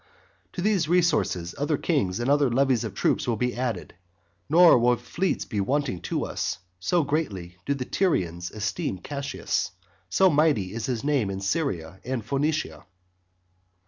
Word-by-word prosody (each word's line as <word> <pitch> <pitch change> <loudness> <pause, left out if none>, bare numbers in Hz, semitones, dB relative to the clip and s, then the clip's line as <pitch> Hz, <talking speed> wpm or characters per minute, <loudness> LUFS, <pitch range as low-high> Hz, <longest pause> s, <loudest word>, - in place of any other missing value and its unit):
To 175 - -4
these 195 -6 +2
resources 170 - +1
other 145 +1 +1
kings 100 - 0
and 120 - -1
other 145 -1 +4
levies 130 -1 +2
of 105 -4 -5
troops - - +1
will 120 - +1
be 125 +3 -1
added. 120 -6 -3 0.6
Nor 170 -3 +7
will 120 +1 +4
fleets 170 +10 -2
be 105 -3 -2
wanting 135 -4 -1
to - - -2
us; - - -2 0.2
so 160 - +2
greatly 100 - -3
do 140 - +1
the 130 -2 -4
Tyrians 90 - 0
esteem 105 -2 -3
Cassius, 140 +8 -3 0.4
so 190 - +4
mighty 145 - +2
is 115 -1 -3
his 120 -4 -2
name 140 -8 +1
in 95 0 -3
Syria 95 - -2
and 125 -3 -3
Phoenicia. 135 - -1
125 Hz, 155 wpm, -26 LUFS, 100-150 Hz, 0.6 s, Nor